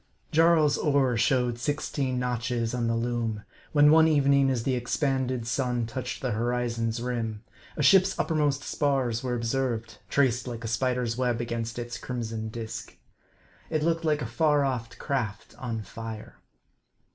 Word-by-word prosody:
JARL'S 160 -2 +4
oar 140 -5 +2
showed 125 0 +1
sixteen 140 -1 -1
notches 120 -1 -1
on 120 -2 0
the 115 - +1
loom, 115 -2 -2 0.3
when 150 0 +6
one 160 0 +7
evening, 140 -3 +4
as 125 -3 0
the 130 - 0
expanded 130 -1 -1
sun 120 -1 0
touched 120 +4 -5
the 130 - 0
horizon's 115 0 -1
rim, 115 -3 -3 0.3
a 150 - 0
ship's 190 +4 +5
uppermost 145 -4 +1
spars 130 -6 0
were 125 -2 -2
observed, 115 -1 -2
traced 130 -3 +2
like 120 -2 -5
a - - -3
spider's 125 0 0
web 125 -2 0
against 115 -1 -3
its 120 -1 -5
crimson 115 -3 -4
disk. 110 0 -7 0.7
It 155 -2 0
looked 165 0 +1
like 150 -3 +1
a - - -3
far 145 +4 +2
off 125 -4 -2
craft 110 -8 -3
on 115 -4 -3
fire. 110 0 -8
125 Hz, 150 wpm, -27 LUFS, 115-140 Hz, 0.7 s, one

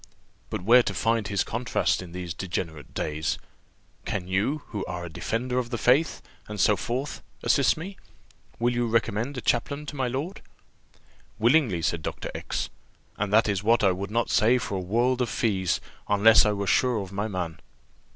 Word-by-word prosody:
But - - -4
where 120 +5 +7
to - - -3
find 115 -2 +1
his 100 -1 +1
contrast 120 -3 0
in 90 -2 -9
these 90 -1 -5
degenerate 85 -3 -5
days? 75 +1 -1 0.7
Can 90 -3 -3
you, 105 +11 0
who 105 -3 -3
are 90 0 -4
a - - -6
defender 125 +8 -1
of 120 -2 -3
the 120 - -2
faith, 135 +7 +2 0.2
and 105 -1 -6
so 105 +3 +5
forth, 125 +8 -3 0.2
assist 130 -3 +3
me? 190 +5 -7 0.6
Will 120 +1 +1
you 120 0 0
recommend 115 +3 0
a - - -3
chaplain 140 +6 0
to 145 - -7
my 130 -2 0
lord?" 140 +10 -4 1.0
"Willingly," 115 - +3
said 85 0 0
Dr. - - -5
X; - - -3 0.5
"and 105 -1 -2
that 110 +2 +5
is 100 -3 0
what 115 +1 +3
I 95 - +5
would 95 +2 -4
not 115 +2 0
say 120 +2 +4
for 115 -4 -4
a 95 - 0
world 120 +7 +1
of 120 - 0
fees, 100 -5 0 0.3
unless 105 +2 +6
I 105 - +2
were 100 -1 -2
sure 125 +3 +2
of 95 -2 -6
my 100 +2 -2
man." 90 -5 -4
110 Hz, 185 wpm, -26 LUFS, 95-125 Hz, 1.0 s, where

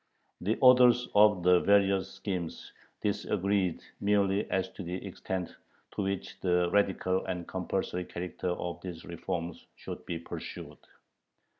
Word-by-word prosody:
The 105 +5 0
authors 125 -1 +7
of 105 -3 +5
the 90 0 +6
various 95 -1 +3
schemes 90 -5 -5 0.3
disagreed 100 -3 0 0.2
merely 100 0 +2
as 95 -1 0
to - - -9
the 90 0 -4
extent 95 -2 -4 0.4
to - - -2
which 100 -1 -3
the 90 -1 +2
radical 95 -2 +2
and 90 -2 -3
compulsory 90 0 -2
character 90 +1 -4
of 90 0 -3
these 90 -3 -7
reforms 85 0 -5
should - - -8
be 85 - -2
pursued. 85 - -8
95 Hz, 130 wpm, -30 LUFS, 90-100 Hz, 0.4 s, authors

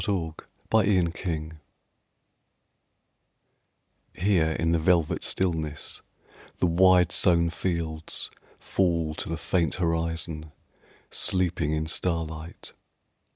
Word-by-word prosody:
THE 85 -6 -1 0.4
INDIA 95 -5 +3
WHARF 80 -3 -5 2.5
HERE 90 -4 +2
in 80 +1 0
the 85 - +2
velvet 85 -1 +2
stillness 80 -5 -1 0.6
The - - +2
wide 90 0 +5
sown 85 -3 +3
fields 80 -3 -2 0.3
fall 85 -4 0
to - - -4
the 80 - -2
faint 85 -2 0
horizon, 80 -2 -2 0.6
Sleeping 90 -4 +1
in 80 0 -1
starlight. 80 -1 -2
85 Hz, 90 wpm, -27 LUFS, 80-90 Hz, 2.5 s, wide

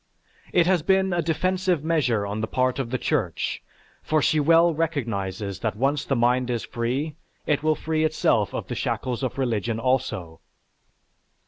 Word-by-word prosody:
It 175 -2 +4
has 180 -2 +3
been 190 +2 +2
a 175 - +1
defensive 180 +1 0
measure 130 -10 +1
on 105 +2 -3
the 110 - -1
part 130 +2 0
of 130 -4 -2
the 130 - -1
Church, 115 - -1 0.4
for 155 - +1
she 155 +1 +2
well 165 +3 +5
recognizes 110 - -2
that 110 -2 -2
once 135 +5 0
the 135 - 0
mind 125 +1 +2
is 120 -2 -2
free, 130 +6 -2 0.3
it 145 -1 +1
will 155 0 +2
free 160 0 -1
itself 155 0 +2
of - - -4
the - - -5
shackles 125 -1 -2
of 130 -1 -3
religion 115 -3 -1
also. 110 -10 -1
135 Hz, 165 wpm, -24 LUFS, 115-160 Hz, 0.4 s, well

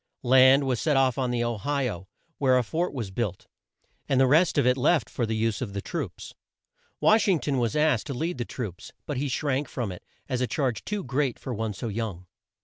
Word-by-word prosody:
Land 130 +2 +6
was 125 -3 0
set 150 -4 +2
off 130 -1 +2
on 130 -1 0
the 120 -1 0
O 120 -1 -1
hi 140 +3 0
o 95 -5 -6 0.3
where 130 -2 +4
a 125 - +2
fort 165 +10 -1
was 115 -8 -5
built, 95 -3 -3 0.6
and 130 - +3
the 135 - +6
rest 155 +7 +4
of - - +3
it 125 0 +4
left 130 -1 +2
for 120 - -1
the 110 - -1
use 110 +1 0
of 110 -6 -4
the 100 - -3
troops. - - -5 0.7
Wash 215 0 +4
ing 190 -4 +4
ton 140 -3 -1
was 115 -3 0
asked 150 -6 +2
to 140 - -4
lead 160 +2 -3
the - - 0
troops, 110 -7 -7
but 145 - -3
he 145 +3 -1
shrank 140 +1 -1
from 115 -6 -3
it 90 - -9 0.2
as 130 -2 -2
a 125 - +1
charge 130 -7 -1
too 210 -1 -3
great 135 -1 -1
for 130 - -6
one 110 -2 -3
so 115 - -5
young. 105 -5 -4
125 Hz, 235 wpm, -26 LUFS, 115-140 Hz, 0.7 s, Land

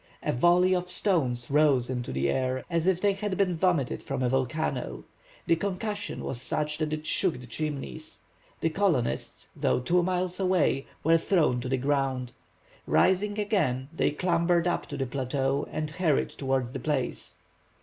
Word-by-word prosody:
A - - +1
volley 175 +7 +4
of 180 0 -1
stones 135 - +1
rose 140 -4 +4
into 125 -2 -3
the 65 +1 0
air 130 - 0
as 170 +1 +1
if 185 -2 +3
they 200 +1 +2
had 195 -1 -3
been 185 -3 +2
vomited 165 -6 +1
from 135 -1 -3
a 125 - +2
volcano. 135 +5 -1 0.4
The 165 - +4
concussion 205 +3 -3
was 120 - -4
such 150 +2 -2
that 155 -1 -1
it 155 0 -3
shook 170 -5 +1
the 125 - -10
Chimneys. 155 +3 -5 0.4
The 165 - +1
colonists, 165 -10 -1
though - - +1
two 175 +8 +2
miles 180 0 -1
away, 180 -7 +1 0.2
were 165 +2 +4
thrown 155 -9 +2
to 125 - -4
the 130 - +1
ground. 135 -2 -1 0.6
Rising 205 +3 +3
again, 155 - 0
they - - +2
clambered 170 +1 +1
up 175 - -1
to - - -6
the 135 - -1
plateau 135 +2 -1
and 155 -1 -3
hurried 160 -3 +1
towards 130 -3 -1
the - - -5
place. 145 -4 -3
155 Hz, 170 wpm, -28 LUFS, 130-180 Hz, 0.6 s, volley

